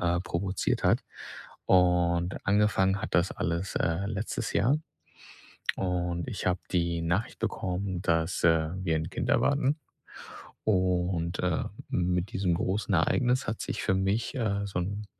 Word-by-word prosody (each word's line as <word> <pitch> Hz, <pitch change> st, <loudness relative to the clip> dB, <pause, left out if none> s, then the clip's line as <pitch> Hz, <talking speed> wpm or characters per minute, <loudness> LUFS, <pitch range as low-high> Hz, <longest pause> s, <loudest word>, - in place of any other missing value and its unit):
äh, 85 Hz, 0 st, +1 dB
provoziert 95 Hz, +1 st, -1 dB
hat. -, -, +4 dB, 0.7 s
Und, 90 Hz, -1 st, +3 dB
angefangen 100 Hz, -1 st, +3 dB
hat -, -, -5 dB
das 90 Hz, +1 st, +3 dB
alles, 85 Hz, +4 st, -2 dB
äh, 85 Hz, +4 st, 0 dB
letztes 110 Hz, +3 st, -3 dB
Jahr. 135 Hz, +7 st, +3 dB, 1.0 s
Und 90 Hz, -1 st, -1 dB
ich 115 Hz, -, -4 dB
habe 90 Hz, 0 st, +1 dB
die 85 Hz, -2 st, +1 dB
Nachricht 90 Hz, +7 st, -1 dB
bekommen, 95 Hz, 0 st, -2 dB
dass, 80 Hz, 0 st, 0 dB
äh, 80 Hz, -1 st, +4 dB
wir 80 Hz, -3 st, +1 dB
'n 80 Hz, +1 st, -3 dB
Kind -, -, -3 dB
erwarten. 140 Hz, +1 st, +2 dB, 0.9 s
Und, 90 Hz, -3 st, +1 dB
äh, 90 Hz, -3 st, 0 dB, 0.2 s
mit 90 Hz, +1 st, 0 dB
diesem 95 Hz, -2 st, +1 dB
großen 100 Hz, +4 st, -1 dB
Ereignis 125 Hz, +9 st, +2 dB
hat 110 Hz, -, -2 dB
sich -, -, -3 dB
für -, -, +2 dB
mich, 95 Hz, +4 st, 0 dB
äh, 100 Hz, -4 st, 0 dB
so 95 Hz, -3 st, -3 dB
'n 100 Hz, +4 st, -3 dB
90 Hz, 140 wpm, -29 LUFS, 85-100 Hz, 1.0 s, hat